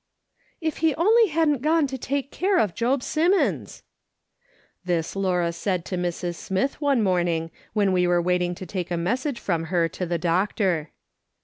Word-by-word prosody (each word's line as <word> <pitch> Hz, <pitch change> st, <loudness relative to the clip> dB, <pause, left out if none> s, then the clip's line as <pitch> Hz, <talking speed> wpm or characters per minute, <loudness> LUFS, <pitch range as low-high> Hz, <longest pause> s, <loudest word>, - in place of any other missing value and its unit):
"If 315 Hz, -2 st, -2 dB
he 320 Hz, -2 st, +2 dB
only 440 Hz, +7 st, +4 dB
hadn't 305 Hz, -5 st, +1 dB
gone 315 Hz, +1 st, +3 dB
to 270 Hz, -1 st, -4 dB
take 275 Hz, +2 st, -3 dB
care 380 Hz, +1 st, +1 dB
of 205 Hz, -6 st, +2 dB
Job 245 Hz, +6 st, 0 dB
Simmons 300 Hz, -, 0 dB, 0.5 s
!" -, -, -38 dB
This 175 Hz, -2 st, -1 dB
Laura 180 Hz, -3 st, +1 dB
said 180 Hz, 0 st, -2 dB
to 185 Hz, -, -4 dB
Mrs. 175 Hz, 0 st, -2 dB
Smith 195 Hz, +11 st, -2 dB
one 280 Hz, -6 st, +2 dB
morning 175 Hz, -3 st, 0 dB, 0.2 s
when 205 Hz, -3 st, +2 dB
we 180 Hz, -1 st, +2 dB
were 175 Hz, 0 st, +3 dB
waiting 180 Hz, 0 st, 0 dB
to 185 Hz, -, -8 dB
take 180 Hz, -1 st, -4 dB
a 175 Hz, -, -1 dB
message 245 Hz, -, -1 dB
from 165 Hz, -4 st, -1 dB
her 170 Hz, 0 st, +1 dB
to 180 Hz, -, -4 dB
the 170 Hz, 0 st, 0 dB
doctor. 175 Hz, -1 st, 0 dB
190 Hz, 175 wpm, -24 LUFS, 175-280 Hz, 0.5 s, only